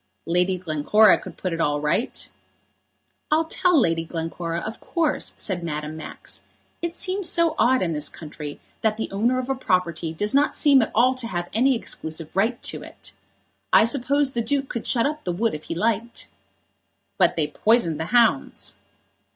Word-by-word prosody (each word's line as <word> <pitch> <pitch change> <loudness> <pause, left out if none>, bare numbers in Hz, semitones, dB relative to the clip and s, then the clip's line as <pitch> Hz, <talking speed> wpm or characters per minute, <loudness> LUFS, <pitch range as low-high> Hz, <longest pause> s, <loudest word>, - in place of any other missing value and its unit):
"Lady 180 +2 +1
Glencora 180 +5 +4
could - - -10
put 185 -2 -3
it 165 - -2
all 145 -1 +1
right." 150 - -1 1.0
"I'll 315 +2 +3
tell 360 0 +2
Lady 165 -7 +1
Glencora, 165 +1 -4
of 220 +4 -6
course," 330 -4 -1
said 180 -4 -2
Madame 150 -1 -4
Max. 160 - -7 0.4
"It 340 0 -4
seems 375 -1 -1
so 335 -3 +2
odd 255 -3 +4
in 165 -2 -1
this 150 -1 -1
country 150 -2 -8 0.2
that 215 -1 +1
the 225 - -4
owner 230 +6 +1
of 255 -1 -2
a 270 - +1
property 180 -9 -1
does 205 +6 0
not 285 +2 +2
seem 280 -3 +5
at 225 - 0
all 250 +4 +5
to 255 -3 -4
have 175 -4 -4
any 260 +4 +3
exclusive 160 -7 -4
right 225 +5 +1
to - - 0
it. - - -10 0.6
I - - +7
suppose 280 +3 +1
the 235 - -1
Duke 270 +4 -1
could 235 - -4
shut 235 -3 +2
up 300 +1 -2
the 180 - -2
wood 220 +6 0
if 150 - -7
he - - -4
liked." 230 +4 -1 0.9
"But - - +4
they 155 - +1
poisoned 190 -2 +2
the 160 - -2
hounds." 245 +5 +2
220 Hz, 180 wpm, -23 LUFS, 165-260 Hz, 1.0 s, I